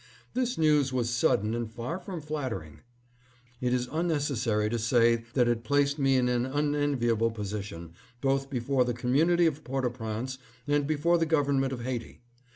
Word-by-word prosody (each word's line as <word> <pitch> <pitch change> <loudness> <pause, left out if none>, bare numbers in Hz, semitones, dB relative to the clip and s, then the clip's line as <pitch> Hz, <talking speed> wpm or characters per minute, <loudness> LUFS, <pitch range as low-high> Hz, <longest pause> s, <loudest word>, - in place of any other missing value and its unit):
This 250 -1 -1
news 150 -4 +3
was 120 -2 0
sudden 110 -2 +2
and 115 -1 -3
far 120 +10 -4
from 180 -2 -6
flatter 145 - -3
ing. 75 -1 -15 0.8
It 125 -1 0
is 125 0 0
unnecessary 140 -10 0
to 120 +2 -1
say 115 0 +3
that 125 -3 +4
it 120 -1 0
placed 145 +1 +1
me 135 -1 +3
in 125 -1 +3
an 120 -1 +1
unenviable 135 -5 +1
position, 100 -6 -6 0.3
both 135 +1 0
before 130 0 +1
the 120 -1 -2
community 160 +9 +3
of 155 -2 0
Port 135 0 -2
au 125 - 0
Prince 120 +2 -5 0.3
and 145 -1 +1
before 160 +3 +2
the 165 - +1
government 140 -4 +2
of 125 -2 -4
Haiti. 125 -1 -5
130 Hz, 170 wpm, -28 LUFS, 115-145 Hz, 0.8 s, that